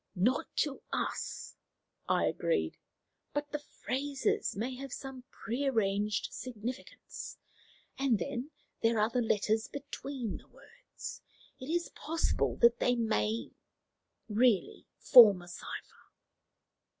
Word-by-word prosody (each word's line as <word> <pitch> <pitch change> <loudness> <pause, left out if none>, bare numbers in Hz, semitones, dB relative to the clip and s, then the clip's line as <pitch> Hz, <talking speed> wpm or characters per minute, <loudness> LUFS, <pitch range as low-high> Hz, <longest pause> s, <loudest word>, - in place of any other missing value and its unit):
"Not 220 +8 +2
to 285 -3 -2
us," - - -3 0.5
I - - +3
agreed; 485 - 0 0.6
"but 290 0 -2
the 295 - -2
phrases 280 -1 -1
may 250 +5 -2
have 275 0 -7
some 265 -1 -7
pre 260 +5 -3
arranged 210 -4 +1
significance. 245 +1 -6 0.6
And 270 -5 +3
then 275 +3 -3 0.3
there 225 0 +3
are 215 +2 +3
the 250 - +1
letters 220 +1 +1
between 275 -4 -5
the - - -17
words. 485 0 -10 0.4
It 260 - -7
is 345 +1 0
possible 325 +2 0
that 235 0 +7
they 245 - +3
may 110 - 0 0.8
really 220 -1 +2
form 220 -8 +9
a - - -13
cipher." 175 - -9
250 Hz, 115 wpm, -32 LUFS, 215-275 Hz, 0.8 s, form